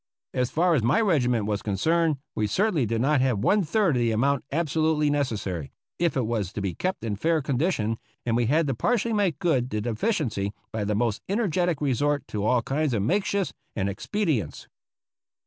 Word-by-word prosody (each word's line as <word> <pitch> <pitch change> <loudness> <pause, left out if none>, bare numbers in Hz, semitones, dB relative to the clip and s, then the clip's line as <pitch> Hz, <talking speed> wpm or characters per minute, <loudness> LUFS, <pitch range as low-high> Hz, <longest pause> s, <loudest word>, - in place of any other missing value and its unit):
As 125 -1 0
far 175 +2 +2
as 145 - +3
my 120 +7 +3
regiment 125 - +2
was 105 -1 -1
concerned, 160 - +1 0.2
we 105 - 0
certainly 175 - +1
did 115 +1 -1
not 140 +1 +3
have 130 -4 +2
one 200 - +3
third 190 -2 +1
of - - +1
the 120 -1 +2
amount 135 +5 +1
absolutely 155 -1 +1
necessary, 105 - -2 0.3
if 170 -4 +1
it 125 - +1
was 110 -5 -2
to - - -4
be 100 -3 -2
kept 185 -6 -3
in 110 -3 -2
fair 160 +9 +1
condition, 130 - 0 0.3
and 115 -1 +1
we 120 -1 +2
had 155 +5 +3
to 135 - 0
partially 235 - 0
make 200 -8 +1
good 130 -8 +1
the 110 - -2
deficiency 115 - -1 0.2
by 110 -1 -2
the 105 +1 0
most 115 -1 0
energetic 180 -6 0
resort 145 +1 0
to 105 -2 -3
all 120 +2 +2
kinds 140 -1 0
of 100 - 0
makeshifts 195 - 0 0.2
and 95 -2 0
expedients. 150 - -2
135 Hz, 190 wpm, -26 LUFS, 110-165 Hz, 0.3 s, as